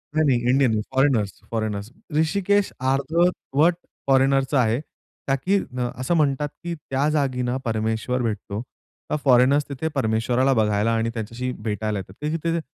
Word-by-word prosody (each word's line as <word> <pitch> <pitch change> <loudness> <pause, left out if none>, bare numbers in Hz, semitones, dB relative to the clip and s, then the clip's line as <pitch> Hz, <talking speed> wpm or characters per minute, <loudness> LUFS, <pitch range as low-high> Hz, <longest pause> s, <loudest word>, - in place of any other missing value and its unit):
नाही, 155 0 +3
नाही, 125 -3 +3
इंडियन 130 -1 +4
नाही. 110 -1 +1
Foreigners, 130 -8 +2
foreigners. 110 -1 -3 0.2
ऋषिकेश 200 +5 +2 0.2
अर्धवट 160 +2 +2 0.3
फॉरेनरचं 135 +1 +3
आहे. 115 -1 +2 0.5
का 135 - +3
की 185 +9 +1 0.2
असं 125 +5 -2
म्हणतात, 145 -2 +1
की 175 0 -3
त्या 140 -2 -1
जागी 140 -4 0
ना 125 0 -1
परमेश्वर 110 +2 -1
भेटतो. 105 -2 -3 0.5
तर - - +2
फॉरेनर्स 135 +2 +5
तिथे 140 +3 -3
परमेश्वराला 120 +2 +2
बघायला 105 -1 +2
आणि 115 0 0
त्यांच्याशी 115 +3 -4
भेटायला 105 -1 -2
येतात. 95 -1 -9
तर 150 - -2 0.2
तिथे 170 0 +1
130 Hz, 145 wpm, -23 LUFS, 110-145 Hz, 0.5 s, फॉरेनर्स